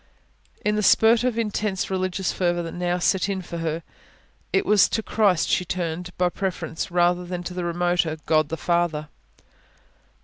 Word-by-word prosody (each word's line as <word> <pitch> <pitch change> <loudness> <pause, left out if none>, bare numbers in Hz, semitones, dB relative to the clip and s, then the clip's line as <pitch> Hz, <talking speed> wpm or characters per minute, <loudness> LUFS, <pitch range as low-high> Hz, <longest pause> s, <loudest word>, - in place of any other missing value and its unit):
In 210 0 +2
the 210 - +1
spurt 225 +3 +5
of 250 -2 0
intense 210 -4 -1
religious 185 0 -1
fervour 175 -1 0
that 165 - -6
now 175 0 -1
set 190 +2 +1
in 190 -2 -2
for 170 -1 -6
her, 165 0 -2 0.7
it 390 0 +2
was 210 - +5
to 220 - -1
Christ 200 -7 +2
she - - +1
turned 180 0 -3
by 180 0 +2
preference, 180 -3 -4
rather 175 0 +2
than 175 0 -5
to 180 - -6
the 180 0 -3
remoter 175 -2 0
God 155 -2 +2
the 165 - -3
Father. 160 0 0
180 Hz, 170 wpm, -24 LUFS, 170-195 Hz, 0.7 s, spurt